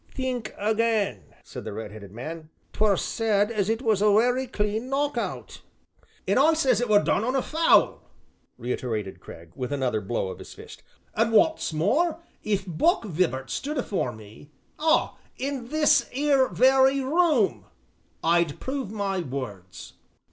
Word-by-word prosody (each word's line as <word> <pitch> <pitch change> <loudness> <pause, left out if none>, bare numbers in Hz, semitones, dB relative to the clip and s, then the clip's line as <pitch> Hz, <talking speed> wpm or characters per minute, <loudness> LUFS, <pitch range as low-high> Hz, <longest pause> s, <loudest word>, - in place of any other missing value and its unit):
"Think 255 -4 -3
again," 215 - 0 0.2
said - - -9
the - - -6
red 110 0 -6
headed 100 -2 -11
man, 155 +8 -8 0.2
"'t - - -14
were 210 -3 +3
said 210 0 0
as 210 -3 -1
it 225 +3 -1
was 215 -4 +2
a 210 - +5
werry 245 +5 +2
clean 215 +3 -2
knock 285 +2 0
out." - - -5 0.7
"An' - - +3
I 315 +4 +5
say 275 -5 +2
it 245 0 0
were 205 -1 +5
done 200 - +1
on 255 +3 -1
a 265 - +1
foul," 325 +2 +3 0.6
reiterated 115 -4 -4
Cragg, 80 0 -13
with 125 +1 -4
another 130 -6 -1
blow 100 -1 -2
of - - -8
his - - -11
fist, - - -12 0.3
"an' 225 +1 +2
wot's 320 - +3
more, 265 - +1 0.2
if 200 -2 -1
Buck 235 - +1
Vibart 160 -8 -1
stood 295 +2 -3
afore 200 - -1
me 110 +5 -14 0.3
ah, 315 +1 +1 0.2
in 265 -2 -4
this 300 0 +3
'ere 275 -1 +2
very 265 +1 +4
room, 265 - +2 0.6
I'd 170 -2 +2
prove 265 -6 -4
my 200 -3 -2
words." 125 - -7
215 Hz, 160 wpm, -25 LUFS, -, 0.7 s, a